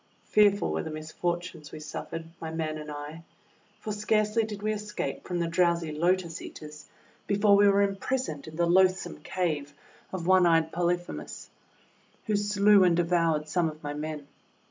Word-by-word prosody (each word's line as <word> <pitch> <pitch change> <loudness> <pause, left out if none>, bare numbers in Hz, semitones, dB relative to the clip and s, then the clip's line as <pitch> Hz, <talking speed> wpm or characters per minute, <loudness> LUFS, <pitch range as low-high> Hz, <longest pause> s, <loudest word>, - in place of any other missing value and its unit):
Fearful 205 -1 +3
were - - -1
the 160 - -6
misfortunes 155 +1 -4
we - - -8
suffered, 165 +1 -6
my 160 - -5
men 160 -1 -3
and 150 0 -8
I! 150 +2 -7 0.6
For 215 - -4
scarcely 215 +1 +1
did 210 -2 -6
we 215 0 +1
escape 210 0 -5
from 180 - -2
the 170 - 0
drowsy 170 -1 +1
Lotus 170 +1 0
Eaters 150 -1 -10 0.4
before 205 0 +4
we 205 0 +6
were 200 0 +4
impris 250 +7 -2
oned 145 -1 -7
in 155 - -9
the 170 +1 +2
loathsome 185 +2 +2
cave 150 -6 -2 0.4
of 185 -3 -4
one 185 -1 +5
eyed 165 -1 +3
Poly 175 +1 +1
phemus, 175 - -9 0.8
who 215 - 0
slew 205 -1 +4
and 175 -2 +4
devoured 165 -3 +1
some 165 +1 +1
of 155 0 -12
my 145 0 -3
men. 150 -1 -5
175 Hz, 170 wpm, -28 LUFS, 155-200 Hz, 0.8 s, we